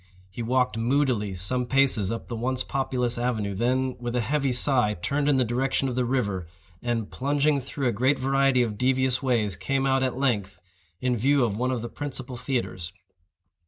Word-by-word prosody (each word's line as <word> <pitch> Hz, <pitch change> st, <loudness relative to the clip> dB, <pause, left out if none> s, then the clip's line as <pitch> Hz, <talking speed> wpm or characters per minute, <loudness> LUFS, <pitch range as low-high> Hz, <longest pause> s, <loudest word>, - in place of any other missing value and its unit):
He 120 Hz, -, -6 dB
walked 125 Hz, 0 st, +1 dB
moodily 120 Hz, -5 st, +1 dB
some 120 Hz, +8 st, 0 dB
paces 130 Hz, -7 st, +2 dB
up 115 Hz, -, -5 dB
the 120 Hz, -, -5 dB
once 130 Hz, +3 st, 0 dB
populous 125 Hz, -3 st, 0 dB
avenue, 110 Hz, -5 st, -1 dB
then, 130 Hz, +5 st, 0 dB
with 120 Hz, 0 st, -4 dB
a 125 Hz, -, +2 dB
heavy 140 Hz, +3 st, 0 dB
sigh, 125 Hz, -4 st, +2 dB
turned 140 Hz, +11 st, -1 dB
in 145 Hz, -, +4 dB
the 130 Hz, -1 st, +2 dB
direction 130 Hz, +3 st, 0 dB
of 125 Hz, -, -3 dB
the 125 Hz, -1 st, +1 dB
river, 100 Hz, -9 st, -1 dB, 0.3 s
and, 120 Hz, -3 st, -2 dB
plunging 145 Hz, +1 st, +1 dB
through 135 Hz, +1 st, -3 dB
a -, -, +2 dB
great 130 Hz, +6 st, +2 dB
variety 135 Hz, -1 st, +2 dB
of 105 Hz, -3 st, -4 dB
devious 130 Hz, 0 st, +2 dB
ways, 115 Hz, -8 st, +1 dB
came 135 Hz, +7 st, -1 dB
out, 135 Hz, 0 st, +2 dB
at 130 Hz, -1 st, -1 dB
length, 105 Hz, -8 st, -1 dB, 0.4 s
in 125 Hz, -1 st, +1 dB
view 135 Hz, +4 st, +3 dB
of 110 Hz, -4 st, 0 dB
one 125 Hz, +4 st, 0 dB
of 125 Hz, -3 st, -2 dB
the -, -, -3 dB
principal 130 Hz, -2 st, -6 dB
theatres. 120 Hz, -9 st, -3 dB
125 Hz, 190 wpm, -26 LUFS, 115-135 Hz, 0.4 s, in